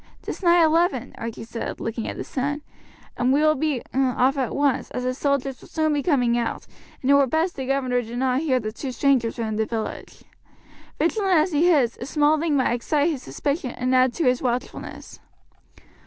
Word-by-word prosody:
"'Tis -, -, -6 dB
nigh 345 Hz, -2 st, +5 dB
eleven," 315 Hz, -5 st, +1 dB
Archie 230 Hz, -1 st, -5 dB
said, 230 Hz, 0 st, -5 dB
looking 225 Hz, 0 st, -4 dB
at -, -, -5 dB
the -, -, -4 dB
sun, 290 Hz, +3 st, -3 dB, 0.5 s
"and 250 Hz, +1 st, +2 dB
we 285 Hz, +2 st, +3 dB
will 310 Hz, 0 st, +5 dB
be 295 Hz, -3 st, -1 dB
off 260 Hz, +1 st, +2 dB
at 265 Hz, -4 st, -2 dB
once, 285 Hz, -2 st, +1 dB
as 250 Hz, -, -4 dB
the 255 Hz, 0 st, 0 dB
soldiers 275 Hz, -2 st, -1 dB
will -, -, -14 dB
soon 315 Hz, -1 st, 0 dB
be 290 Hz, -, 0 dB
coming 250 Hz, -7 st, +2 dB
out, 235 Hz, -, -3 dB, 0.4 s
and 265 Hz, -, +3 dB
it -, -, +7 dB
were 280 Hz, -1 st, +5 dB
best 320 Hz, +6 st, 0 dB
the 265 Hz, -2 st, -5 dB
governor 255 Hz, -2 st, +1 dB
did 235 Hz, +1 st, -7 dB
not 255 Hz, 0 st, +1 dB
hear 265 Hz, -5 st, +1 dB
that 215 Hz, -2 st, -5 dB
two 265 Hz, +1 st, -4 dB
strangers 255 Hz, -3 st, +1 dB
were 230 Hz, -, -2 dB
in 215 Hz, -1 st, -3 dB
the 220 Hz, -, +1 dB
village. 225 Hz, -2 st, -5 dB, 0.7 s
Vigilant 375 Hz, +3 st, +2 dB
as 315 Hz, +4 st, +2 dB
he 325 Hz, +4 st, +3 dB
is, 270 Hz, -9 st, +2 dB
a 245 Hz, -, -4 dB
small 300 Hz, +1 st, +2 dB
thing 310 Hz, -2 st, +1 dB
might 255 Hz, -3 st, +2 dB
excite 290 Hz, +6 st, +1 dB
his 280 Hz, -5 st, -4 dB
suspicion 280 Hz, -, -3 dB
and 255 Hz, +1 st, 0 dB
add 255 Hz, 0 st, +4 dB
to 335 Hz, -, -2 dB
his 250 Hz, 0 st, +2 dB
watchfulness." 250 Hz, 0 st, -4 dB
270 Hz, 210 wpm, -23 LUFS, 245-300 Hz, 0.7 s, it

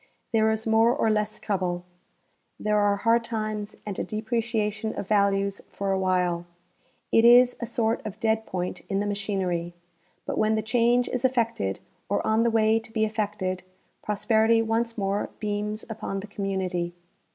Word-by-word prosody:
There 220 Hz, -1 st, +4 dB
is 220 Hz, 0 st, -1 dB
more 225 Hz, +2 st, +4 dB
or 225 Hz, -6 st, +2 dB
less 210 Hz, 0 st, -1 dB
trouble. 180 Hz, -3 st, -2 dB, 0.7 s
There 210 Hz, 0 st, +1 dB
are 205 Hz, -1 st, +3 dB
hard 230 Hz, +3 st, +2 dB
times 215 Hz, -2 st, -3 dB
and 205 Hz, -3 st, -4 dB
a -, -, 0 dB
depreciation 220 Hz, -1 st, -2 dB
of 195 Hz, -, -5 dB
values 200 Hz, -1 st, +2 dB
for 200 Hz, -1 st, -3 dB
a 190 Hz, -, +1 dB
while. 180 Hz, -2 st, 0 dB, 0.6 s
It 225 Hz, -, +5 dB
is 245 Hz, +1 st, +7 dB
a 235 Hz, -, -4 dB
sort 225 Hz, 0 st, 0 dB
of 215 Hz, -1 st, -7 dB
dead 220 Hz, 0 st, 0 dB
point 180 Hz, -1 st, -3 dB
in 195 Hz, -1 st, 0 dB
the 205 Hz, -, -1 dB
machiner}^; 190 Hz, -4 st, -2 dB, 0.5 s
but -, -, -2 dB
when 215 Hz, 0 st, +3 dB
the 220 Hz, -, -1 dB
change 240 Hz, +2 st, +2 dB
is 250 Hz, -, -2 dB
efii'ected, 230 Hz, -, 0 dB, 0.3 s
or 200 Hz, -, 0 dB
on 220 Hz, +1 st, +3 dB
the 235 Hz, -, +3 dB
way 225 Hz, 0 st, +3 dB
to 225 Hz, -, -13 dB
be 220 Hz, -1 st, +1 dB
effected, 205 Hz, -4 st, -2 dB, 0.4 s
pros 210 Hz, 0 st, -4 dB
perity 225 Hz, +1 st, +4 dB
once 230 Hz, +1 st, 0 dB
more 200 Hz, 0 st, -1 dB
beams 210 Hz, +1 st, -3 dB
upon 210 Hz, -3 st, -4 dB
the -, -, -7 dB
community. 190 Hz, -4 st, -2 dB
215 Hz, 170 wpm, -26 LUFS, 195-225 Hz, 0.7 s, is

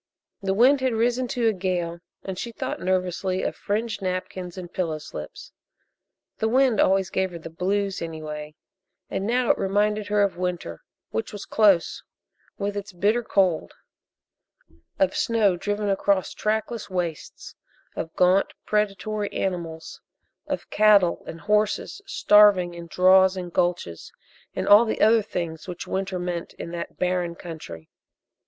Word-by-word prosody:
The 195 Hz, -1 st, 0 dB
wind 260 Hz, +5 st, +5 dB
had 260 Hz, -2 st, +1 dB
risen 240 Hz, +3 st, +1 dB
to 240 Hz, -1 st, 0 dB
a 220 Hz, -, +3 dB
gale 180 Hz, -3 st, -2 dB, 0.2 s
and 190 Hz, -, -5 dB
she 235 Hz, -, -4 dB
thought -, -, -4 dB
nervously 185 Hz, 0 st, -1 dB
of -, -, -2 dB
fringed 215 Hz, +1 st, -2 dB
napkins 185 Hz, -1 st, -4 dB
and 180 Hz, -1 st, -8 dB
pillow 165 Hz, -4 st, -1 dB
slips 75 Hz, -, -9 dB, 0.9 s
the 220 Hz, -, +1 dB
wind 255 Hz, -2 st, +3 dB
always 190 Hz, 0 st, +3 dB
gave 190 Hz, 0 st, 0 dB
her 175 Hz, -, -8 dB
the 165 Hz, 0 st, -9 dB
"blues" 195 Hz, +3 st, -1 dB
anyway, 155 Hz, -2 st, -6 dB, 0.6 s
and 195 Hz, -, -2 dB
now 245 Hz, +1 st, +3 dB
it -, -, -1 dB
reminded 205 Hz, +2 st, +1 dB
her 205 Hz, 0 st, +3 dB
of 190 Hz, -4 st, -1 dB
winter, 175 Hz, -, -4 dB, 0.3 s
which 110 Hz, -, -3 dB
was 205 Hz, -1 st, -7 dB
close, 200 Hz, -6 st, +3 dB, 0.6 s
with 200 Hz, 0 st, -2 dB
its 205 Hz, -1 st, -6 dB
bitter 205 Hz, +7 st, +2 dB
cold 190 Hz, -7 st, +1 dB, 1.2 s
of 190 Hz, -1 st, +2 dB
snow 215 Hz, -5 st, +2 dB
driven 205 Hz, +3 st, -2 dB
across 195 Hz, -1 st, +1 dB
trackless 220 Hz, +1 st, -2 dB
wastes, 175 Hz, -4 st, -4 dB, 0.4 s
of 160 Hz, -, -4 dB
gaunt 185 Hz, +2 st, +3 dB
predatory 210 Hz, 0 st, -1 dB
animals, 170 Hz, -4 st, -4 dB, 0.5 s
of -, -, -4 dB
cattle 205 Hz, -4 st, +4 dB
and 165 Hz, 0 st, -8 dB
horses 210 Hz, -, 0 dB
starving 205 Hz, -, +5 dB
in 170 Hz, 0 st, -9 dB
draws 185 Hz, +2 st, +5 dB
and 175 Hz, -2 st, -6 dB
gulches, 175 Hz, -, -1 dB, 0.4 s
and -, -, -2 dB
all 205 Hz, +3 st, +8 dB
the 220 Hz, -, -2 dB
other 220 Hz, +1 st, +5 dB
things 170 Hz, -5 st, -5 dB
which 180 Hz, -1 st, -6 dB
winter 190 Hz, -1 st, -2 dB
meant 175 Hz, -1 st, -4 dB
in 170 Hz, -, -8 dB
that 170 Hz, 0 st, -6 dB
barren 180 Hz, -1 st, -1 dB
country. 155 Hz, -, -9 dB
190 Hz, 150 wpm, -24 LUFS, 175-210 Hz, 1.2 s, all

